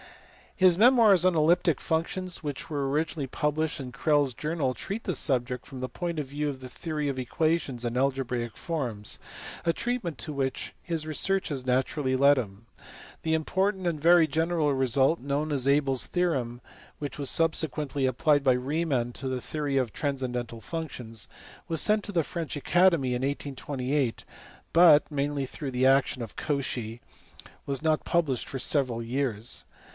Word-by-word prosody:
His 185 -2 +5
memoirs 220 -7 +6
on 185 -2 +4
elliptic 160 -1 +3
functions 175 +3 -2
which 145 +1 -5
were 140 -3 -1
originally 150 0 -1
published 150 +4 -1
in 130 -2 -6
Crellds 145 0 +2
Journal 150 -1 -1
treat 200 - -5
the - - -1
subject 125 -3 0
from 135 -2 -9
the 130 0 -4
point 170 -2 -4
of 145 - -3
view 145 +2 -2
of 135 -2 -6
the 130 -1 -9
theory 150 +1 -3
of 135 -2 -2
equations 135 -1 -1
and 120 +1 -2
algebraic 125 -4 -1
forms, 125 -11 -4 0.5
a 165 - +2
treatment 230 - -2
to 135 +6 -3
which 135 -2 -2
his 165 -3 -2
researches 155 -4 0
naturally 130 +1 0
led 140 +2 +5
him. 105 -2 -5 0.6
The 160 0 +1
important 190 +4 0
and 165 -3 -1
very 170 0 +6
general 160 0 +1
result 135 +4 +2
known 145 +3 -2
as 135 -2 0
Abel 140 -1 +3
s 125 - +2
theorem, 135 -10 -1 0.4
which 145 -3 -5
was 140 - -1
subsequently 150 -4 0
applied 145 +3 +2
by 130 -2 +5
Riemann 130 -2 -1
to 135 - -4
the 130 -1 -2
theory 145 -1 -2
of 125 -5 0
transcendental 125 -5 -3
functions, 125 - -6 0.4
was 165 -1 0
sent 215 -1 +4
to - - -2
the 170 -4 +1
French 165 0 -5
Academy 170 -2 +3
in 125 0 -1
1828, 135 -1 -2 0.5
but 165 -3 +7
(mainly 145 -1 -1
through 140 +1 -6
the 130 +1 +2
action 135 -1 +3
of 115 - -9
Cauchy) 125 -6 -3 0.7
was 140 -1 -1
not 155 -1 +1
published 150 -8 0
for 135 - -4
several 130 -4 0
years. 120 -2 -1
140 Hz, 160 wpm, -27 LUFS, 130-160 Hz, 0.7 s, but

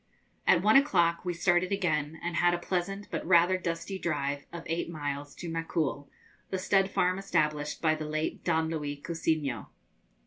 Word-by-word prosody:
At 175 -1 +5
one 215 +2 +5
o'clock 175 - +3
we 180 - -1
started 175 +1 +2
again, 160 -5 0
and 170 -1 -2
had 175 0 +4
a - - -2
pleasant 190 +3 -3
but - - -2
rather 175 +1 +5
dusty 175 +2 -3
drive 145 -4 -2
of 170 -1 -7
eight 165 +1 -2
miles 145 -3 -4
to 175 - -7
Macul, 165 -4 -2 0.4
the 190 - -1
stud 195 +1 +2
farm 185 0 +1
established 150 -6 -1
by 155 -1 +4
the 155 0 -4
late 155 +1 -3
Don 160 0 +1
Luis 145 -3 -3
Cousiño. 155 -8 -1
170 Hz, 170 wpm, -29 LUFS, 150-180 Hz, 0.4 s, At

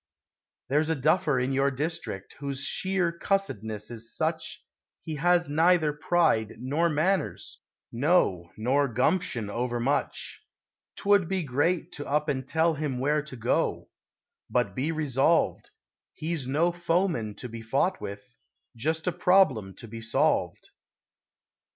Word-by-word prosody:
There's 150 +4 +1
a 160 - +2
duffer 150 -1 +2
in 130 +2 0
your 135 +1 +3
district 140 - -4
Whose 140 -1 -3
sheer 190 -2 0
cussedness 110 - -2
is 115 -1 -5
such - - -2 0.3
He 155 -2 -6
has 175 +2 +3
neither 160 +1 +3
pride 150 -8 +1
nor 145 +8 0
manners 155 - -1 0.3
No, 115 - +2
nor 135 +6 +2
gumption, 125 - 0
overmuch. 120 +5 -2 0.5
'Twould 200 -3 +3
be 190 -1 -1
great 150 +6 0
to 145 - -7
up 150 +2 0
and 130 -2 -2
tell 165 0 +2
him 145 -4 -3
Where 150 +4 +1
to 150 -3 -9
go. 115 -1 -1 0.6
But 125 -1 +1
be 140 +5 -1
resolved 155 0 +1 0.5
He's 155 -4 -3
no 160 +6 +2
foeman 170 - 0
to 125 - -7
be 115 -1 -8
fought 140 +11 0
with, 100 +5 -8 0.4
Just 160 +7 -1
a 180 - +2
problem 175 - +3
to 115 - -10
be 115 +1 -8
solved. 115 0 0
145 Hz, 130 wpm, -27 LUFS, 120-170 Hz, 0.6 s, your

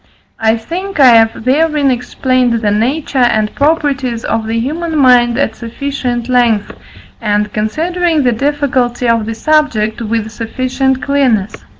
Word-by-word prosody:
I 220 0 +2
think 350 - -6
I 265 -2 +7
have 225 -1 +3
therein 295 +1 +2
explained 250 0 0
the 205 - +1
nature 265 +7 -1
and 220 -4 +2
properties 280 -6 0
of 225 -1 -2
the 225 +1 -1
human 315 +6 -3
mind 245 -3 +4
at 225 -5 -1
sufficient 245 0 -4
length, 240 -5 +1 0.5
and, 210 -1 -1
considering 320 +8 -1
the 250 - +2
difficulty 255 -2 -1
of 230 -2 +1
the 225 - -4
subject, 240 -7 0
with 220 -1 -2
sufficient 255 +4 -2
clearness. 250 -8 0
250 Hz, 135 wpm, -13 LUFS, 225-280 Hz, 0.5 s, I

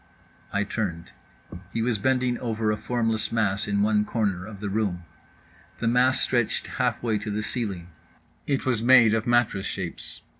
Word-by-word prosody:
_" - - -31 0.5
I 100 0 +1
turned. 90 -5 -4 0.6
He 115 - -1
was 115 -3 0
bending 125 +1 +1
over 110 -2 -1
a - - +1
formless 115 -1 -1
mass 105 -4 0
in 100 0 +1
one 105 0 +3
corner 100 -4 -1
of 105 -2 -9
the 105 - -4
room. 100 -4 -1 0.7
The 115 - -2
mass 125 +3 +3
stretched 120 -3 +1 0.2
halfway 110 -3 0
to 105 +1 -5
the 105 +1 -2
ceiling. 100 -6 -4 0.6
It 140 -2 0
was 125 -4 +1
made 120 -2 +6
of 110 0 0
mattress 120 -5 +2
shapes. 90 -4 -5
110 Hz, 165 wpm, -25 LUFS, 100-120 Hz, 0.7 s, made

